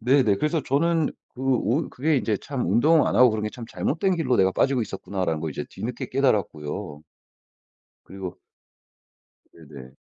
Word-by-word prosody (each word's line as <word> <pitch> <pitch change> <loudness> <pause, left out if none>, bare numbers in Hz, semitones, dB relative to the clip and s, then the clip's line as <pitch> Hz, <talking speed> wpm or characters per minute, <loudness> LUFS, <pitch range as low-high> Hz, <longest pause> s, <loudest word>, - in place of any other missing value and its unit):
네네. 125 -4 +3
그래서 150 +4 0
저는 160 +3 +1 0.3
그 125 - -10
오 135 +2 +1
그게 150 +4 0
이제 110 -5 0
참 135 +2 -4
운동을 155 +6 +4
안 - - 0
하고 125 -1 +7
그런 110 -1 -2
게 105 - -1
참 120 - -9
'잘못된 180 - -1
길로 130 -7 +1
내가 95 0 +4
빠지고 130 +2 +2
있었구나.'라는 95 -5 -3
걸 80 - -3
이제 - - -5
뒤늦게 120 +2 -5
깨달았고요. 85 - -1 1.0
그리고 95 -2 -7 1.2
네네. 70 -5 -13
120 Hz, 335 characters per minute, -24 LUFS, 95-140 Hz, 1.2 s, 하고